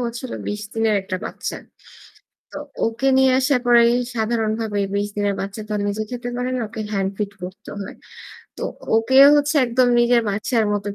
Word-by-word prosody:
হচ্ছিলো 235 +2 -6
২০ 210 0 -4
দিনের 225 -1 +1
একটা 190 -1 -4
বাচ্চা। - - -5 1.0
তো - - -8 0.3
ওকে 230 +4 -1
নিয়ে 265 0 +5
আসার 260 0 +2
পরেই 235 0 +6 0.2
সাধারণভাবেই 220 -2 -1
২০ 205 0 0
দিনের 205 -1 0
বাচ্চা 200 +2 -6
তো - - -2
নিজে 215 +2 -2
খেতে 245 0 -5
পারে 250 +1 -2
না 250 - -2
ওকে 220 0 -7
হ্যান্ড 195 -1 0
ফিড 205 -1 -3
করতে 190 +4 -9
হয়। 195 - -8 0.6
তো - - -5 0.3
ওকে 245 +4 0 0.2
হচ্ছে 295 +1 +1
একদম 245 +1 +2
নিজের 240 0 +4
বাচ্চার 220 +3 0
মতো 205 0 -3
225 Hz, 170 wpm, -21 LUFS, 205-245 Hz, 1.0 s, পরেই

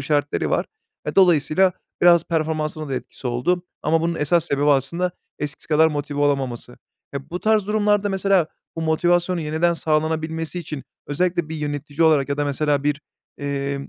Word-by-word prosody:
işaretleri 145 +1 0
var. - - +1 0.4
Eee, - - -3
dolayısıyla 180 0 +4 0.3
biraz 170 -1 +6
performansına 155 -2 -2
da 135 - -2
etkisi 130 - -6
oldu 125 +9 0 0.2
ama 160 +2 +2
bunun 170 +1 0
esas 160 +2 +2
sebebi 140 +1 0
aslında 170 +7 +1 0.3
eskisi 150 +1 -5
kadar 160 +1 +5
motive 145 -1 -3
olamaması. 135 -4 -1 0.4
Eee, 140 +2 -6
bu 180 - -4
tarz 215 -2 +2
durumlarda 210 -1 +2
mesela 195 -3 +2 0.3
bu 165 - -3
motivasyonun 175 +2 +2
yeniden 160 +3 +1
sağlanabilmesi 160 +1 -1
için 150 -4 -6 0.2
özellikle 175 +2 0
bir 160 - -5
yönetici 145 +1 -3
olarak 150 -4 +4
ya 140 - -1
da 145 - 0
mesela 145 0 0
bir, 150 0 0 0.4
emm, 140 -1 -3
155 Hz, 160 wpm, -22 LUFS, 145-175 Hz, 0.4 s, biraz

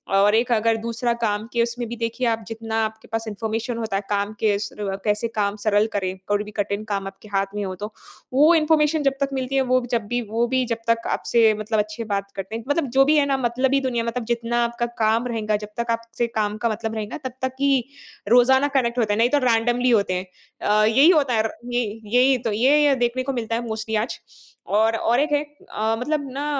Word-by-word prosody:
और 205 +2 +4
एक 235 +2 +1
अगर 225 0 +2
दूसरा 235 +2 -2
काम 210 -1 0
कि 235 - +2
उसमे 235 +1 -3
भी 235 +1 -6
देखिए 230 +2 -2
आप 225 -1 0
जितना 225 0 -5
आपके 220 0 -8
पास 225 0 -3
इन्फॉर्मेशन 225 +3 -3
होता 225 -3 -3
है, 195 - 0
काम 205 0 -1
के 210 -2 +2
शुरू 205 0 -5 0.2
कैसे 210 +2 0
काम 200 -1 +1
सरल 210 0 +3
करें, 190 -2 -2
कोई 205 0 +1
भी 210 - -10
कठिन 205 0 -1
काम 195 -1 -2
आपके 195 +2 -11
हाथ 195 -1 +1
में 205 - -2
हो 190 -1 -4
तो। 210 +4 -6 0.4
वो 300 +6 +6
इन्फॉर्मेशन 310 -1 +2
जब 275 -1 +2
तक 275 - +1
मिलती 265 0 -2
है 270 - +4
वो 255 - +5
जब 230 -3 0
भी 245 +2 -1
वो 230 +2 +1
भी 260 +1 +1
जब 230 - +1
तक 230 0 +1
आपसे 225 -2 +3
मतलब 215 +1 -1
अच्छे 215 +2 -3
बात 200 0 -2
करते 195 +2 -5
हैं, 230 - -5
मतलब 290 +1 +1
जो 270 - +7
भी 300 +2 +4
है 290 - +4
ना 275 -1 +1
मतलबी 260 +3 +1
दुनिया 245 -3 -1
मतलब 230 +1 -3
जितना 235 0 -1
आपका 235 0 -2 0.2
काम 225 +3 +2
रहेगा, 215 -3 -1
जब 210 0 -5
तक 235 0 -1
आपसे 230 +1 -2
काम 210 -1 0
का 235 +1 0
मतलब 220 0 -3
रहेगा 215 -1 -4
तब 255 - -4
तक 260 0 -1
की 275 -3 +3 0.5
रोज़ाना 265 +4 +5
कनेक्ट 240 -1 0
होते 215 -3 +2
हैं, - - -1
नहीं 230 +2 +3
तो 290 - +3
रैंडमली 240 +2 +2
होते 205 -5 +2
हैं। 185 +1 -2 0.4
अ, 210 +1 +3
यही 265 +9 +5
होता 290 -8 +3
है 220 -1 +2
र - - -8 0.2
ये 245 0 +2 0.2
यही 250 +5 +4
तो - - 0
ये-ये 275 +6 +4
देखने 250 +2 -2
को 275 +1 -2
मिलता 230 -2 -2
है 235 +1 -3
मोस्टली 220 0 -3
आज - - -8 0.6
और 225 +1 +3
और 235 +2 +1
एक 295 +2 +1
है 290 0 +2 0.3
अ, 220 +1 0
मतलब 285 +2 -2
ना 290 - -2
230 Hz, 235 wpm, -23 LUFS, 215-250 Hz, 0.6 s, जो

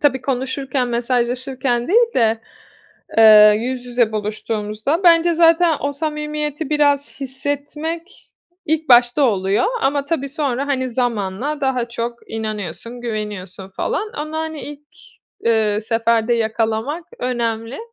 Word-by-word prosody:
tabii 275 -3 +2
konuşurken, 260 0 -2
mesajlaşırken 245 +1 -1
değil 465 +4 +3
de, 225 -2 +2 0.8
eee, 215 -1 +9
yüz 250 +2 -4
yüze 240 -3 +1
buluştuğumuzda. 215 - -2
Bence 335 0 +5
zaten 330 0 +4
o 285 0 -1
samimiyeti 300 0 -3
biraz 285 -2 +1
hissetmek 290 +6 -5 0.4
ilk 315 0 -1
başta 245 +3 +5
oluyor 200 - +2 0.2
ama 280 +1 +1
tabii 280 -3 -2
sonra, 275 -2 -2
hani, 260 -2 -1
zamanla 240 +4 -2
daha 255 -3 0
çok 235 0 -6
inanıyorsun, 220 +1 -5
güveniyorsun 210 -5 -5
falan. 410 - -3
Onu, 310 +1 -5
hani, 315 -2 -4
ilk, 295 0 -9 0.6
eee, 220 -2 +2
seferde 230 +1 +1
yakalamak 225 +7 -1
önemli. 235 -1 -2
250 Hz, 115 wpm, -19 LUFS, 225-295 Hz, 0.8 s, eee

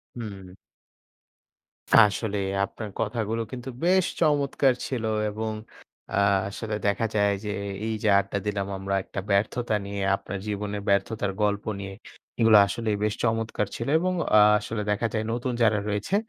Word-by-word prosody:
হুম। 100 -6 -8 1.5
আসলেই 105 -1 +2 0.2
আপনার 110 +2 -8
কথাগুলো 115 0 -1
কিন্তু 125 0 -6 0.2
বেশ 185 0 +4
চমৎকার 145 -4 +3
ছিল 125 -4 -3 0.3
এবং 110 +1 -3 0.6
আ - - -2 0.3
আসলে 110 +1 -4
দেখা 100 +3 +1
যায় 100 -1 +3
যে 105 - -3 0.4
এই 110 - -1
যে 110 - +3
আড্ডা 100 +1 -3
দিলাম 100 -2 -1
আমরা 95 0 -2
একটা - - -6
ব্যর্থতা 110 +3 +1
নিয়ে 100 0 -4
আপনার 100 0 -6
জীবনের 105 0 -3
ব্যর্থতার 100 +1 +1
গল্প 105 0 0
নিয়ে 95 0 -6 0.5
এগুলো 110 -2 +7
আসলেই 110 +2 -1
বেশ 105 0 +1
চমৎকার 115 -2 0
ছিল 115 - -4
এবং 185 +1 0 0.2
আ - - +8 0.2
আসলে 110 0 -4
দেখা 105 +3 0
যায় 110 - 0
নতুন 120 +1 -2
যারা 105 -2 +3
রয়েছে 105 - -1
105 Hz, 145 wpm, -26 LUFS, 100-115 Hz, 1.5 s, আ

